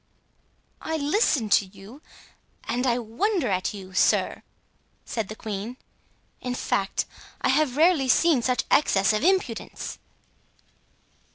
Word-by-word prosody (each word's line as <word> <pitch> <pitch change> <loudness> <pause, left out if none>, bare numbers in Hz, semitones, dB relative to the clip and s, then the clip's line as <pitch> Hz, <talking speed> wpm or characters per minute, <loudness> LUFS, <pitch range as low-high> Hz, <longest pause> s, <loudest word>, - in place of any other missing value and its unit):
"I 320 - -2
listen 290 - +1
to 200 - +4
you, 200 +8 -14 0.6
and 250 +2 -1
I 240 -1 +2
wonder 255 - -1
at 185 -1 0
you, 190 -2 -10
sir," - - +2 0.6
said 225 -4 -3
the 215 - -7
queen. 220 +3 -6 0.6
"In 250 0 -3
fact, 195 -5 -1 0.4
I - - +1
have 275 -1 +2
rarely 315 -4 +4
seen 300 +1 +4
such 250 +1 0
excess 195 -8 +3
of 215 - -1
impudence." 360 -11 -1
245 Hz, 120 wpm, -25 LUFS, 210-300 Hz, 0.6 s, to